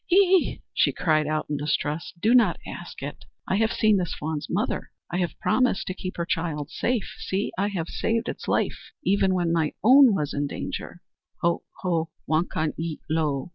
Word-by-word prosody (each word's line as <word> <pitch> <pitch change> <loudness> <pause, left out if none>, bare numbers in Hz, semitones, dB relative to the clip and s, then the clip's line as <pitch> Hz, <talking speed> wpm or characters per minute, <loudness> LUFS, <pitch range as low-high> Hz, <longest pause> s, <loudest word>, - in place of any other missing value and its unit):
"Ye 360 - +5
e 380 -3 +5
e!" - - -15
she - - +3
cried 155 -3 +2
out 155 0 0
in 145 - -2
distress. 150 +4 -1
"Do 220 +7 +3
not 245 -2 +5
ask - - -8
it! - - -7 0.2
I 190 - +1
have 220 +1 +2
seen 215 -2 +3
this 180 -3 -2
fawn's 150 -1 -4
mother. - - -1 0.2
I 175 - -1
have 175 -2 -2
promised 255 -6 +2
to 185 - -3
keep 185 0 -6
her 170 - -1
child 165 -3 -2
safe. 240 -4 -1
See! 195 +2 -2
I 200 +2 +1
have 180 -5 -3
saved 225 +5 -1
its - - -5
life, - - -1
even 190 -1 +3
when 175 -2 +1
my 160 -3 +1
own 255 -1 +8
was 150 -5 -1
in 145 0 -1
danger." - - -6 0.4
"Ho, 170 0 +2 0.2
ho, 165 -3 0 0.2
wakan 155 -1 0
ye 165 -1 -3
lo! 150 -3 0
175 Hz, 195 wpm, -25 LUFS, 155-205 Hz, 0.4 s, own